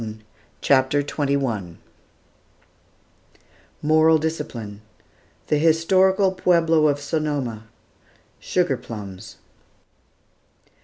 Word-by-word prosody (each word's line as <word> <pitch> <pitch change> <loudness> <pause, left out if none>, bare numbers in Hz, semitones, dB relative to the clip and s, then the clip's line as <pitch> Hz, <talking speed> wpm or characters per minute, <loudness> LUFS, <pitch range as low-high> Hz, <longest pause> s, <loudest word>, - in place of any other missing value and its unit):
"] - - -34
CHAPTER 140 +1 +2
XXI 135 - -2 2.1
MORAL 155 +1 +4
DISCIPLINE 120 -10 -5 0.6
THE 150 - +1
HISTORICAL 185 +5 +3
PUEBLO 165 -4 +2
OF 145 -1 0
SONOMA 145 -7 -3 0.7
SUGAR 175 -8 0
PLUMS. 105 -6 -9
145 Hz, 65 wpm, -22 LUFS, 120-160 Hz, 2.1 s, MORAL